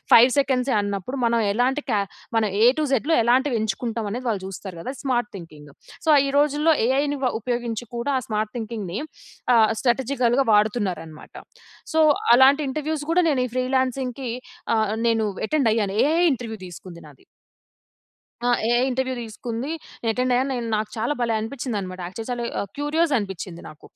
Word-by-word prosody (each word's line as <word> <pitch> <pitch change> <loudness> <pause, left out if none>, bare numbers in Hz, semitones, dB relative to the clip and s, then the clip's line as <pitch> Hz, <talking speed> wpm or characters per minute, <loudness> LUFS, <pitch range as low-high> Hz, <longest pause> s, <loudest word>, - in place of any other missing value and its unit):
5 240 +3 +8
సెకండ్సే 265 -1 +1
అన్నప్పుడు, 205 +5 -3
మనం 235 0 +2
ఎలాంటి 255 +6 +1
కే 215 - +2 0.4
మనం 220 -2 +2
ఏ - - +8
టూ - - +2
జెడ్‌లో 275 +5 +2
ఎలాంటివి 250 +2 +2
ఎంచుకుంటాం 225 +1 -2
అనేది, 250 +4 -4
వాళ్ళు 205 -4 -1
చూస్తారు 190 -1 -8
కదా! 255 - -5
Smart 245 -5 0
thinking. 150 -4 -12 0.3
సో, - - -3
ఆహ్, 275 - +5
ఈ - - -1
రోజుల్లో 295 +2 +3
ఏఐని 285 +3 +1
వ 250 - +3
ఉపయోగించి 240 -1 -3
కూడా 235 +4 -2
ఆ - - -2
స్మార్ట్ 215 -1 -2
థింకింగ్‌ని 215 -5 -4 0.6
ఆహ్, 220 -2 +5
స్ట్రాటజికల్‌గా 255 0 +1
వాడుతున్నారనమాట. 200 -7 -1 0.6
సో, 320 - +3 0.4
అలాంటి 275 +3 +6
ఇంటర్వ్యూస్ 305 +2 -3
కూడా 355 +2 +4
నేను 275 -5 +2
ఈ - - -7
ఫ్రీలాన్సింగ్‌కి 255 0 -1 0.5
ఆహ్, 215 -1 +1
నేను 225 -1 +2 0.2
అటెండ్ 275 -3 +2
అయ్యాను 205 -3 0
ఏ‌ఐ 325 +3 +2
ఇంటర్వ్యూ 225 -3 -7
తీసుకుంది 175 -1 -11
నాది. 140 - -19 1.2
ఆ! 245 - +2 0.2
ఏ‌ఐ 240 +1 +3
ఇంటర్వ్యూ 260 0 -1
తీసుకుంది. 230 +4 -5 0.4
అటెండ్ 250 +2 0
అయ్యాను. 260 +2 +1
నేను 240 -2 -3
నాకు 215 0 -3
చాలా 230 +6 0
భలే! 230 -2 +1
అనిపించింది 240 +1 -4
అన్నమాట 185 -1 -7
యాక్చువల్లీ 235 +5 -4
ఆహ్, 200 - -4
క్యూరియస్ 300 +2 +1
అనిపించింది 190 -4 -6
నాకు. 155 0 -14
240 Hz, 160 wpm, -23 LUFS, 215-265 Hz, 1.2 s, 5